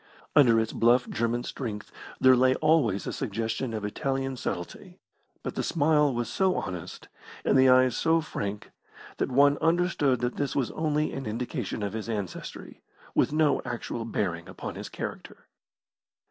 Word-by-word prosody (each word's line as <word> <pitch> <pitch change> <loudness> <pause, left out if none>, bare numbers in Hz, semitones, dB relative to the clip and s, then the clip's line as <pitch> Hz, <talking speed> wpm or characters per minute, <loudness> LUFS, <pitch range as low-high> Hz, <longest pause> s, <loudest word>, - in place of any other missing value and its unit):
Under 120 -6 +6
its 110 0 -1
bluff 120 +2 +3
German 120 +1 -1
strength 110 -5 -6 0.3
there 130 0 +7
lay 130 +1 +4
always 130 -12 +2
a - - -3
suggestion 110 +4 -2
of 110 -2 -3
Italian 135 +5 -2
subtlety, 90 -7 -6 0.5
but - - -4
the - - -2
smile 150 -2 +2
was 120 -2 -2
so 190 - +1
honest, 90 -3 -5 0.4
and - - +3
the 130 0 +6
eyes 130 -1 +5
so 165 0 +3
frank, 105 -10 -5 0.5
that - - -1
one 140 +2 +4
understood 165 -6 +2
that 120 0 -2
this 145 -2 -2
was 135 -3 0
only 155 -1 0
an 135 -3 -5
indication 115 - -3
of 100 - -3
his 110 0 -5
ancestry, 100 -5 -6 0.3
with - - +2
no 155 -2 +2
actual 120 -2 -4
bearing 90 -7 -3
upon - - -6
his - - -7
character. - - -7
125 Hz, 160 wpm, -27 LUFS, 110-145 Hz, 0.5 s, there